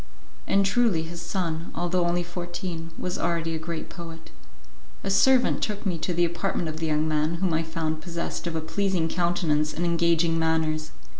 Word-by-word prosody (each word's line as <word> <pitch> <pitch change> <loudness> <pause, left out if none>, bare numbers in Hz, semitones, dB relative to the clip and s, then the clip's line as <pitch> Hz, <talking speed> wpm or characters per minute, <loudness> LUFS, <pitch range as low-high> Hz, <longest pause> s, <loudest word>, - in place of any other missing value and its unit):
And 195 0 +4
truly 200 -5 +3
his 170 +1 -6
son, 170 -2 -2
although 175 +1 +1
only 175 +1 +1
fourteen, 175 -1 -5
was 180 - -3
already 165 -1 0
a 160 - -2
great 165 0 -4
poet. 165 -2 -9 0.7
A 195 - -1
servant 255 +5 +4
took 210 0 -2
me 180 -4 0
to 170 - -1
the 175 0 +3
apartment 170 0 -1
of 155 - -5
the 160 0 -1
young 155 0 +2
man 155 +1 +1
whom 175 0 0
I 160 - +2
found 160 -1 -2
possessed 170 +1 -4
of 165 - -2
a 160 - 0
pleasing 185 0 0
countenance 165 -3 +1
and 175 - 0
engaging 170 -1 +3
manners. 160 -1 +1
170 Hz, 180 wpm, -26 LUFS, 160-175 Hz, 0.7 s, And